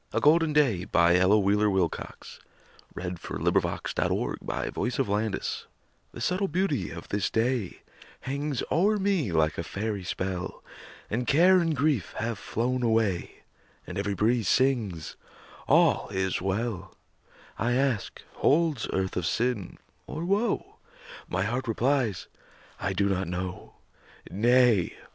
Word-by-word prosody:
A -, -, +1 dB
Golden 160 Hz, +1 st, +4 dB
Day 120 Hz, -11 st, +2 dB
An 85 Hz, +1 st, +5 dB
Ella 95 Hz, +4 st, +5 dB
Wheeler 105 Hz, +1 st, +3 dB
Wilcox 95 Hz, -4 st, -3 dB, 0.6 s
Poem 90 Hz, 0 st, -4 dB
A -, -, -22 dB
GOLDEN -, -, -1 dB
DAY 110 Hz, -4 st, -1 dB, 0.7 s
The -, -, -12 dB
subtle 190 Hz, +2 st, 0 dB
beauty 155 Hz, -, -1 dB
of 85 Hz, 0 st, -9 dB
this 100 Hz, -1 st, 0 dB
day 115 Hz, -4 st, -1 dB, 0.4 s
Hangs 140 Hz, 0 st, -2 dB
o'er 205 Hz, +6 st, +3 dB
me 190 Hz, -, 0 dB
like 80 Hz, -1 st, +1 dB
a -, -, -1 dB
fairy 100 Hz, +1 st, -3 dB
spell, 90 Hz, 0 st, -4 dB, 0.5 s
And 120 Hz, +3 st, -1 dB
care 180 Hz, +5 st, +6 dB
and 165 Hz, -3 st, +1 dB
grief 140 Hz, -, 0 dB
have 115 Hz, -2 st, -2 dB
flown 125 Hz, +3 st, -1 dB
away, 110 Hz, -6 st, 0 dB, 0.4 s
And 90 Hz, +2 st, -5 dB
every 100 Hz, 0 st, -1 dB
breeze 110 Hz, +1 st, +1 dB
sings, 115 Hz, -, 0 dB, 0.5 s
"All -, -, +4 dB
is 95 Hz, -2 st, -1 dB
well." 95 Hz, -1 st, -3 dB, 0.6 s
I 120 Hz, +4 st, +1 dB
ask, 130 Hz, -5 st, -1 dB
"Holds 150 Hz, -5 st, +2 dB
earth 95 Hz, 0 st, -1 dB
of 90 Hz, -2 st, -1 dB
sin, 120 Hz, -5 st, -1 dB, 0.3 s
or 160 Hz, +3 st, -4 dB
woe?" 200 Hz, +4 st, 0 dB, 0.5 s
My 90 Hz, +2 st, 0 dB
heart 120 Hz, +5 st, -2 dB
replies, 115 Hz, -, 0 dB, 0.5 s
"I 95 Hz, 0 st, -1 dB
do 100 Hz, +1 st, +1 dB
not 95 Hz, -2 st, -1 dB
know." 90 Hz, +1 st, -5 dB, 0.6 s
Nay! 120 Hz, -2 st, +3 dB
110 Hz, 130 wpm, -27 LUFS, 95-135 Hz, 0.7 s, care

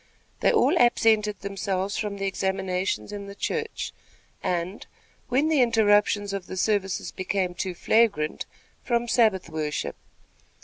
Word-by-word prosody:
They -, -, +4 dB
all -, -, +3 dB
absented 220 Hz, -4 st, +3 dB
themselves 195 Hz, 0 st, -2 dB
from 210 Hz, -2 st, -3 dB
the 195 Hz, -, -3 dB
examinations 190 Hz, -, -1 dB
in 200 Hz, -1 st, -6 dB
the 200 Hz, -, -9 dB
church, 450 Hz, -, -3 dB, 0.5 s
and, 180 Hz, +3 st, -2 dB, 0.5 s
when 270 Hz, +5 st, +2 dB
the 310 Hz, -4 st, +3 dB
interruptions 205 Hz, -3 st, +3 dB
of 195 Hz, -3 st, -4 dB
the 185 Hz, -, -6 dB
services 195 Hz, -1 st, 0 dB
became 185 Hz, -1 st, -1 dB
too 180 Hz, 0 st, -4 dB
flagrant, 200 Hz, -6 st, +1 dB, 0.4 s
from 240 Hz, -1 st, 0 dB
Sabbath 220 Hz, -7 st, +3 dB
worship. 155 Hz, -2 st, -3 dB
200 Hz, 130 wpm, -26 LUFS, 185-220 Hz, 0.5 s, They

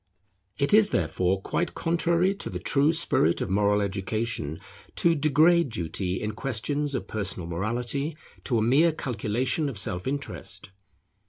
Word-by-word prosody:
It 140 Hz, +5 st, +1 dB
is 215 Hz, -1 st, +6 dB
therefore 90 Hz, +3 st, 0 dB
quite 175 Hz, -, -2 dB
contrary 170 Hz, +3 st, +1 dB
to 200 Hz, -, -6 dB
the -, -, -4 dB
true 145 Hz, +2 st, +2 dB
spirit 160 Hz, -, +2 dB
of -, -, -3 dB
moral 105 Hz, +1 st, +2 dB
education 100 Hz, -4 st, -2 dB, 0.4 s
to 170 Hz, -, +3 dB
degrade 155 Hz, +2 st, +4 dB
duty 90 Hz, -1 st, -2 dB
in 105 Hz, -, -3 dB
questions 140 Hz, +5 st, -2 dB
of -, -, -3 dB
personal 100 Hz, -4 st, -3 dB
morality 120 Hz, -, -2 dB, 0.3 s
to 120 Hz, -, +1 dB
a 110 Hz, -, +2 dB
mere 150 Hz, +8 st, +4 dB
calculation 130 Hz, +2 st, -1 dB
of 125 Hz, -, -7 dB
self 90 Hz, 0 st, 0 dB
interest. 140 Hz, -9 st, -5 dB
120 Hz, 145 wpm, -26 LUFS, 100-155 Hz, 0.4 s, is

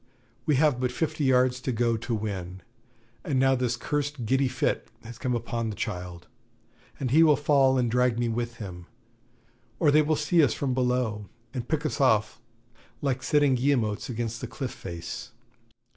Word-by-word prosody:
We 150 Hz, -, +4 dB
have 145 Hz, -2 st, +3 dB
but 125 Hz, -1 st, 0 dB
fifty 155 Hz, +2 st, -1 dB
yards 125 Hz, -1 st, +3 dB
to 130 Hz, -, -2 dB
go 115 Hz, 0 st, +1 dB
to 115 Hz, +1 st, -3 dB
win, 95 Hz, -4 st, -5 dB, 0.6 s
and 135 Hz, -3 st, 0 dB
now 135 Hz, 0 st, +4 dB
this 125 Hz, -2 st, 0 dB
cursed 145 Hz, -2 st, -2 dB
giddy 135 Hz, +4 st, +2 dB
fit 125 Hz, -, -1 dB
has 115 Hz, 0 st, -10 dB
come 125 Hz, -1 st, -1 dB
upon 115 Hz, -1 st, -2 dB
the 105 Hz, -, -5 dB
child, 90 Hz, -5 st, -5 dB, 0.7 s
and 130 Hz, -3 st, -2 dB
he 155 Hz, +4 st, +6 dB
will 155 Hz, -2 st, +6 dB
fall 140 Hz, -2 st, +3 dB
and 120 Hz, -3 st, +1 dB
drag 125 Hz, -1 st, +2 dB
me 120 Hz, 0 st, 0 dB
with 120 Hz, 0 st, -2 dB
him; 90 Hz, -5 st, -8 dB, 0.9 s
or 150 Hz, -1 st, +4 dB
they 155 Hz, +1 st, +6 dB
will 155 Hz, +1 st, +1 dB
see 155 Hz, +2 st, +3 dB
us 135 Hz, -, +2 dB
from 135 Hz, -3 st, -1 dB
below, 125 Hz, -5 st, -1 dB, 0.2 s
and 125 Hz, -3 st, -4 dB
pick 155 Hz, +1 st, -1 dB
us 150 Hz, -, -1 dB
off 110 Hz, -4 st, +2 dB, 0.6 s
like 135 Hz, -2 st, 0 dB
sitting 145 Hz, 0 st, +3 dB
guillemots 125 Hz, -5 st, 0 dB
against 115 Hz, -1 st, -3 dB
the -, -, -4 dB
cliff 135 Hz, -4 st, -5 dB
face.' 85 Hz, -2 st, -7 dB
125 Hz, 175 wpm, -27 LUFS, 115-140 Hz, 0.9 s, he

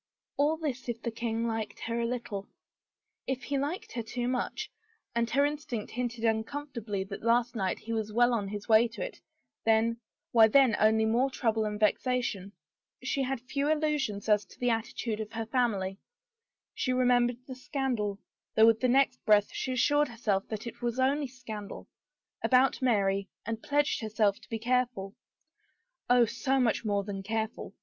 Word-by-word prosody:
All 300 Hz, +3 st, +2 dB
this 270 Hz, -6 st, -4 dB
if 235 Hz, -1 st, -3 dB
the 235 Hz, -, -2 dB
king 230 Hz, 0 st, -2 dB
liked 225 Hz, -2 st, -3 dB
her 230 Hz, +1 st, -2 dB
a 235 Hz, -, 0 dB
little. 225 Hz, -5 st, -4 dB, 0.8 s
If 260 Hz, -1 st, -2 dB
he 280 Hz, -1 st, -1 dB
liked 295 Hz, +7 st, -3 dB
her 235 Hz, -, -3 dB
too 240 Hz, +2 st, -3 dB
much 260 Hz, -, -2 dB, 0.2 s
— 445 Hz, -, -44 dB
and 235 Hz, 0 st, +1 dB
her 280 Hz, +3 st, +3 dB
instinct 290 Hz, -7 st, -4 dB
hinted 240 Hz, -1 st, -3 dB
uncomfortably 225 Hz, -2 st, -2 dB
that 195 Hz, +1 st, -8 dB
last 235 Hz, +2 st, +2 dB
night 190 Hz, -4 st, -1 dB
he 230 Hz, -, -6 dB
was 220 Hz, -1 st, -2 dB
well 240 Hz, +2 st, +4 dB
on 210 Hz, -4 st, -1 dB
his 205 Hz, +1 st, -6 dB
way 225 Hz, +1 st, +6 dB
to 230 Hz, -, -6 dB
it -, -, -9 dB, 0.2 s
— -, -, -56 dB
then 225 Hz, +1 st, +3 dB, 0.2 s
— -, -, -62 dB
why 225 Hz, -2 st, +7 dB
then 255 Hz, -1 st, +5 dB
only 220 Hz, +1 st, +4 dB
more 240 Hz, +5 st, +2 dB
trouble 225 Hz, -4 st, 0 dB
and 210 Hz, 0 st, -3 dB
vexation. 215 Hz, -2 st, 0 dB, 0.5 s
She 275 Hz, -, 0 dB
had 265 Hz, -2 st, -2 dB
few 280 Hz, +3 st, -2 dB
illu 305 Hz, -1 st, +2 dB
sions 210 Hz, -7 st, -3 dB
as 210 Hz, -1 st, +4 dB
to -, -, -18 dB
the 245 Hz, -1 st, +2 dB
attitude 225 Hz, -1 st, -2 dB
of 220 Hz, 0 st, -5 dB
her 225 Hz, 0 st, -3 dB
family. 210 Hz, -6 st, 0 dB, 0.7 s
She 255 Hz, -, -1 dB
remembered 245 Hz, -1 st, +3 dB
the 260 Hz, -, -7 dB
scandal 255 Hz, -6 st, -2 dB, 0.2 s
— -, -, -61 dB
though 220 Hz, -, +7 dB
with 225 Hz, -1 st, +5 dB
the 255 Hz, -, +2 dB
next 260 Hz, 0 st, +3 dB
breath 210 Hz, -1 st, +4 dB
she 260 Hz, -, -2 dB
assured 290 Hz, +4 st, +3 dB
herself 215 Hz, -5 st, -1 dB
that 215 Hz, 0 st, -5 dB
it 235 Hz, +1 st, -8 dB
was 240 Hz, +1 st, -2 dB
only 275 Hz, +2 st, +2 dB
scandal 230 Hz, -5 st, -8 dB, 0.3 s
— -, -, -33 dB
about 260 Hz, +1 st, +4 dB
Mary, 200 Hz, -5 st, +1 dB, 0.2 s
and 225 Hz, +1 st, -3 dB
pledged 290 Hz, -2 st, +1 dB
herself 215 Hz, -2 st, +1 dB
to -, -, -19 dB
be 225 Hz, -, -2 dB
careful 240 Hz, -4 st, 0 dB, 0.5 s
— -, -, -46 dB
Oh, 245 Hz, -1 st, +6 dB
so 265 Hz, +4 st, 0 dB
much 235 Hz, -3 st, +2 dB
more 205 Hz, -2 st, 0 dB
than 195 Hz, -1 st, -5 dB
careful! 220 Hz, +2 st, -3 dB
235 Hz, 190 wpm, -30 LUFS, 215-255 Hz, 0.8 s, why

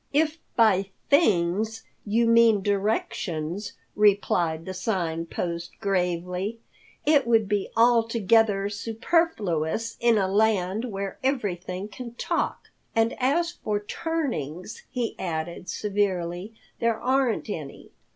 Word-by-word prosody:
"If 310 Hz, +2 st, +2 dB, 0.2 s
by 200 Hz, -4 st, +4 dB, 0.2 s
things 215 Hz, -, +2 dB, 0.2 s
you 230 Hz, +3 st, +3 dB
mean 230 Hz, -3 st, +5 dB
directions," 200 Hz, -3 st, -1 dB, 0.2 s
replied 180 Hz, -6 st, +2 dB
the 185 Hz, -, -5 dB
Sign 175 Hz, -4 st, -2 dB
Post 170 Hz, 0 st, -4 dB
gravely, 180 Hz, +2 st, -1 dB, 0.5 s
"it 290 Hz, -4 st, +4 dB
would 225 Hz, -3 st, +3 dB
be 205 Hz, -1 st, -1 dB
altogether 225 Hz, -3 st, +4 dB
superfluous 220 Hz, -, -1 dB
in 235 Hz, -2 st, +4 dB
a 195 Hz, -2 st, +2 dB
land 205 Hz, +1 st, +1 dB
where 200 Hz, -4 st, -5 dB
everything 195 Hz, -7 st, -2 dB
can 235 Hz, +2 st, -9 dB
talk. -, -, -2 dB, 0.3 s
And 225 Hz, +1 st, +3 dB
as 320 Hz, +7 st, +2 dB
for 210 Hz, -9 st, -2 dB
turnings," 210 Hz, -, -4 dB
he 245 Hz, -2 st, -2 dB
added 170 Hz, 0 st, -4 dB
severely, 195 Hz, -1 st, -1 dB, 0.2 s
"there 230 Hz, -1 st, +1 dB
aren't 260 Hz, -3 st, +1 dB
any. 155 Hz, -9 st, -7 dB
205 Hz, 110 wpm, -26 LUFS, 180-230 Hz, 0.5 s, mean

